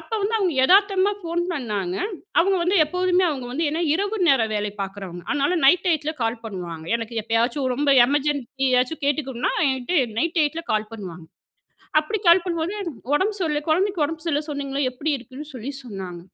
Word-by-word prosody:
அப்ப - - -17
வந்து 425 +3 0
அவங்க 365 -7 0
எதார்த்தமா 395 +2 +4
ஃபோன் 340 0 -2
பண்ணாங்க 210 - -3 0.5
அவங்க 385 +2 +2
வந்து 370 +3 +2
எப்போதுமே, 360 +3 +1
அவங்க 265 -4 -4
வந்து 320 +5 0
என்ன 330 +3 -1
இரவு 405 +4 -1
நேரம் 225 -5 +3
வேலை 210 0 -1
பாக்குறவங்க. 190 -3 -7
அதனால 290 +5 +1
நைட் 355 +6 +5
டைத்துல 310 -2 0
கால் 230 0 -2
பண்ணுவாங்க. 175 -6 -6
எனக்கு 230 0 -7
எப்பயாச்சும் 240 +5 0
ரொம்ப 285 -1 +3
எமர்ஜென்சி 280 -2 -1
ஏதாச்சும் 250 +6 +1
கேட்டுக்கணும்னா 270 -4 -1 0.2
என்கிட்ட 265 +3 +1
நைட் 335 +6 0
டைத்துல 320 +2 0
கால் 215 +1 -1
பண்ணுவாங்க. 180 -6 -8 0.7
அப்டி 310 +8 -2
கால் 345 +1 +7
பண்ணும்போது 340 +2 -2
எனக்கு 340 -6 -4 0.2
உடம்பு 390 +8 +1
சொல்ல 300 -4 0
குழந்தைக்கு 365 +1 +2
உடம்பு 315 +1 -6
சரில்லன்னு 300 -1 -1
சொன்னீங்கள, 280 -1 -3
எப்டி 290 +5 -2
இருக்குன்னு 265 +4 -10
சொல்லி 250 +3 -5
சொன்னாங்க. 190 -7 -7
290 Hz, 170 wpm, -23 LUFS, 235-340 Hz, 0.7 s, கால்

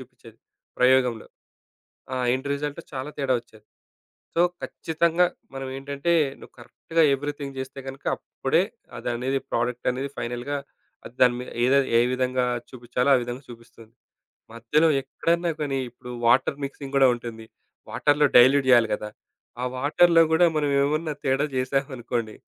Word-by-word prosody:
జూపించేది - - -16 0.4
ప్రయోగంలో. 125 -3 +3 0.9
ఆ - - -2 0.2
end 130 +2 -4
result 145 +3 -4
చాలా 135 +2 -5
తేడా 135 -2 +1
ఒచ్చేది. 110 -2 -21 0.7
సో, 170 - +4 0.2
ఖచ్చితంగా 165 +2 +1 0.3
మనం 135 0 -5
ఏంటంటే 140 +4 -2 0.3
నువ్వు - - -14
కరెక్ట్‌‌గా 165 +7 -1
ఎవరీథింగ్ 145 0 -4
జేస్తే 130 +1 -6
గనుక 135 +1 -9
అప్పుడే - - 0 0.4
అది - - -7
అనేది 135 +3 -1
ప్రొడక్ట్ 120 +1 -1
అనేది 135 +2 -4
ఫైనల్‌గా 120 +4 -3 0.6
దాని 125 -1 +5
మీద 125 - -7
ఏ - - +4 0.3
ఏ - - +5
విధంగా 130 0 0 0.2
చూపించాలో 125 +2 -2
ఆ - - +4
విధంగా 120 +3 -6
చూపిస్తుంది. 115 -1 -14 0.6
మధ్యలో 135 +8 +2
ఎక్కడన్న 170 +5 -1
కానీ 135 -2 -1
ఇప్పుడు 125 +1 -12 0.2
వాటర్ 125 +3 +3
మిక్సింగ్ 140 0 -7
కూడా 135 -1 +6
ఉంటుంది. 115 -2 -8 0.4
వాటర్‌లో 145 0 +3
డైల్యూట్ 130 +2 +6
జేయాలి 120 -3 +5
గదా 105 0 -6 0.5
ఆ - - 0
వాటర్‌లో 165 +5 +4
కూడా 160 +2 +5
మనం 145 -1 +1
ఏమన్నా 155 +2 0
తేడా 135 +2 +2
జేసామనుకోండి 130 -4 -2
135 Hz, 135 wpm, -25 LUFS, 125-145 Hz, 0.9 s, కూడా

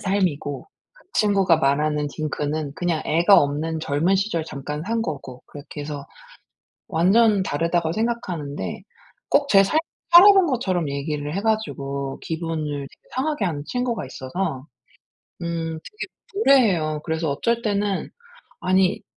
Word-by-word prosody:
삶이고 180 -8 -1 0.3
그 - - -24
친구가 195 -5 +3
말하는 150 +1 +1
딩크는 150 -1 -3
그냥 175 -3 -1
애가 170 +5 +5
없는 155 +3 -1
젊은 160 +6 +1
시절 190 -4 0
잠깐 150 +1 -5
산 230 0 0
거고. 135 - -6
그렇게 145 +1 -9
해서 145 -1 -6 0.8
완전 195 +4 +4
다르다고 165 +1 0
생각하는데 180 -10 -3 0.5
꼭 285 0 +3
제 195 -4 +7
삶을 310 +11 +2 0.3
살아본 385 +1 +9
것처럼 190 - 0
얘기를 145 +2 -3
해 195 - -1
가지고 140 -11 -2
기분을 165 -1 -3 0.2
되게 - - -25
상하게 275 -3 -1
하는 150 -6 -2
친구가 245 - -2
있어서 130 +1 -4 0.8
음 165 -1 -3
되게 425 - -7 0.3
무례해요. 200 - +3
그래서 160 -2 -1
어쩔 235 +11 0
때는 205 -3 -1 0.5
아니 185 0 +2
170 Hz, 290 characters per minute, -23 LUFS, 150-205 Hz, 0.8 s, 살아본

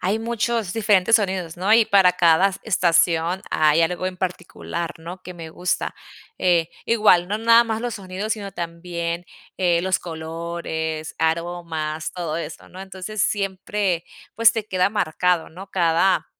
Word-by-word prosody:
hay 200 +4 0
muchos 230 -3 -1
diferentes 210 -1 +3
sonidos, 185 -5 +1
¿no? 195 +4 +1
Y 230 0 +6
para 190 -3 +4
cada 175 +2 +4
estación 170 -2 +2
hay 155 +1 +3
algo 175 +2 0
en 185 - -9
particular, 180 -2 -4
¿no?, 175 +3 -9
que 180 - -8
me 165 -2 -9
gusta, 180 +2 -2 0.4
eh, 170 -3 +2 0.2
igual, 210 -6 +4
no 210 +1 -1
nada 230 +1 +6
más 225 -1 -3
los 240 -2 -3
sonidos, 195 +2 -4
sino 205 -2 -5
también, 170 0 -4 0.3
eh, 175 -2 +2
los 185 0 +1
colores, 160 -1 -5
aromas, 160 -1 -2
todo 170 -4 -3
eso, 165 -1 -7
¿no? 185 - -11
Entonces, 190 +2 -4
siempre, 195 -2 -1 0.3
pues, 230 -1 +6
te 220 -2 -3
queda 185 0 +1
marcado, 180 -3 0
¿no?, 190 +4 -11
cada, 175 +1 +2
180 Hz, 150 wpm, -22 LUFS, 170-200 Hz, 0.4 s, Y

